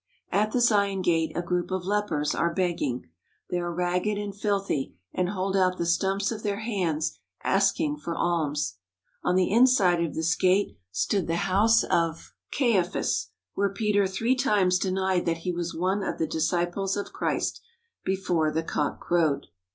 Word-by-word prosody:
At 210 +2 +2
the 245 - +1
Zion 200 -4 +3
Gate 165 -2 +2
a 175 - 0
group 175 0 -1
of 185 -1 -2
lepers 190 -7 0
are 170 - +1
begging. 165 -8 -1 0.5
They 180 - 0
are 175 0 -2
ragged 180 +4 0
and 205 -1 -4
filthy 195 -9 -1 0.2
and 180 -1 0
hold 195 0 -2
out 185 -1 +2
the 170 - -1
stumps 195 +4 +1
of 220 -2 -5
their 205 0 -2
hands 180 -9 -1 0.2
asking 300 -2 +2
for 170 - -5
alms. 150 - -1 0.5
On 180 - +2
the 185 0 +2
inside 210 -8 +4
of 165 - -3
this 160 0 +1
gate 190 +2 +2 0.2
stood 185 - 0
the 165 - 0
house 215 +4 +4
of 165 -1 -1 0.2
Caiaphas, 210 -10 +1 0.3
where 200 0 +1
Peter 205 -1 +1
three 225 +7 +1
times 205 -9 +2
denied 190 -2 0
that 165 -1 +1
he 180 - +1
was 170 -1 -3
one 185 +4 0
of - - -3
the 160 - 0
disciples 175 +5 -1
of 200 - -5
Christ, - - -1 0.4
before 180 -4 0
the 160 +1 -1
cock 150 -2 -2
crowed. 160 -5 +1
185 Hz, 165 wpm, -26 LUFS, 170-200 Hz, 0.5 s, inside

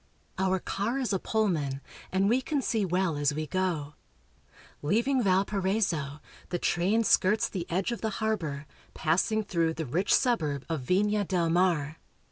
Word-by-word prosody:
Our 190 0 +2
car 205 +7 -2
is 255 -6 -1
a 190 - +1
Pullman, 165 -13 0 0.3
and 190 +1 +2
we 240 +5 +3
can 290 +2 -1
see 220 -3 0
well 180 -3 0
as 145 0 +1
we 155 0 -2
go. 165 -5 -2 0.9
Leaving 235 - +1
Valparaiso, 190 -6 0 0.3
the 175 - -1
train 190 +7 +1
skirts 210 0 +3
the 175 -3 -5
edge 190 +6 0
of 235 - -4
the 220 - 0
harbor, 165 -10 -2 0.3
passing 185 +7 +1
through 165 -4 0
the 160 - -3
rich 175 +10 -1
suburb 155 - +2
of 160 -4 -2
Vina 205 +9 +1
del 175 -3 0
Mar. 165 -4 +1
185 Hz, 155 wpm, -28 LUFS, 160-210 Hz, 0.9 s, we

